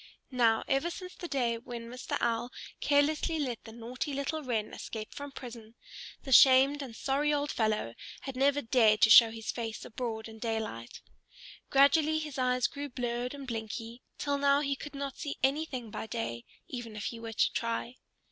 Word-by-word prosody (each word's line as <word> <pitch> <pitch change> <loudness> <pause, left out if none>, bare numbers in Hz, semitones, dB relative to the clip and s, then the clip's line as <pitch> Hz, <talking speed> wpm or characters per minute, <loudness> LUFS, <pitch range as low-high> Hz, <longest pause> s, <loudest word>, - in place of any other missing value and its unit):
Now, 230 -3 +3
ever 275 +5 +1
since 365 +1 -8
the 350 - -7
day 240 -6 0
when 235 -1 -7
Mr. 250 +1 -4
Owl 235 +1 0 0.3
carelessly 300 +3 +2
let 250 -7 -3
the 225 - -9
naughty 245 +5 -5
little 285 +3 -2
Wren 230 -6 -2
escape 215 -1 -6
from 285 0 -7
prison, 235 -4 -10 0.5
the 270 - -6
shamed 270 +3 +7
and 250 -5 -7
sorry 280 +5 0
old 290 0 0
fellow 215 - 0 0.3
had 270 -2 -6
never 280 +2 +2
dared 220 -3 +4
to 220 - +7
show 230 0 +10
his 225 0 -4
face 225 -2 -5
abroad 225 -2 -4
in 220 0 -11
daylight. 220 - -4 0.7
Gradually 300 +3 +5
his 300 -3 -4
eyes 250 -1 +2
grew 285 0 -3
blurred 245 +1 -3
and 280 -1 -8
blinky, 230 +1 -5 0.2
till 285 -1 -1
now 280 0 +4
he 280 -1 0
could 290 +1 -9
not 275 -1 -4
see 285 - -4
anything 270 -5 0
by 220 - -5
day, 215 - -4 0.2
even 240 -4 -6
if 210 - -5
he 230 - -4
were 225 0 -6
to - - +2
try. 230 +2 -2
250 Hz, 180 wpm, -31 LUFS, 225-280 Hz, 0.7 s, show